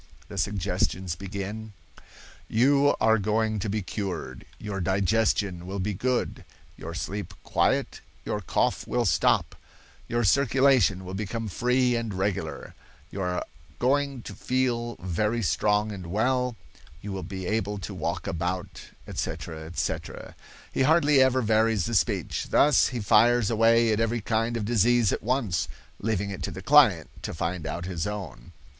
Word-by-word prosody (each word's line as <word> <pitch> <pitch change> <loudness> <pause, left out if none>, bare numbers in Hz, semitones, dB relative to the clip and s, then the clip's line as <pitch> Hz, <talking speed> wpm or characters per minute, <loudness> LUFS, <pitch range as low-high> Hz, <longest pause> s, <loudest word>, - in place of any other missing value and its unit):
The - - -8
suggestions 95 -3 -1
begin: 100 +3 -6 0.7
"'You 140 +5 +4
are 110 0 +4
going 110 +1 0
to 105 - -3
be 105 0 -1
cured; 95 -4 -5
your 100 -2 -5
digestion 95 -1 +1
will 95 +1 -4
be 100 +2 -1
good, 125 +6 -1 0.3
your 85 +1 -7
sleep 95 0 -5
quiet, - - 0 0.2
your - - -2
cough - - 0
will - - 0
stop, - - +2 0.5
your 120 0 0
circulation 130 -5 +3
will 90 - -6
become 110 +3 -3
free 125 +3 +1
and 115 -4 -3
regular; 95 -6 -3 0.4
you 100 - -5
are 90 -1 -1 0.3
going 135 - 0
to - - -8
feel 120 -2 -1
very 105 +6 -1
strong 105 +7 +1
and 95 -4 -7
well, 125 +6 0 0.5
you 105 - -5
will 95 -1 -4
be 95 +1 -6
able 105 0 -1
to 100 - -6
walk - - -3
about,' 90 +3 -3 0.2
etc., 80 -2 -5
etc. 85 - -4 0.4
He - - -1
hardly 150 -1 +5
ever 130 -1 +3
varies 110 -2 +2
the 120 - -3
speech. 95 - 0
Thus 145 -2 +5
he 125 -3 -4
fires 115 +2 +4
away 115 0 +4
at 105 - 0
every 115 +1 0
kind 115 +2 0
of 105 - -3
disease 120 0 +3
at - - -2
once, 110 -9 0 0.3
leaving 100 -2 -1
it 95 - -6
to - - -2
the - - -8
client - - +5
to - - -5
find 85 0 -3
out 85 - -4
his 90 -1 -3
own. 95 -12 -7
105 Hz, 150 wpm, -26 LUFS, 95-120 Hz, 0.7 s, hardly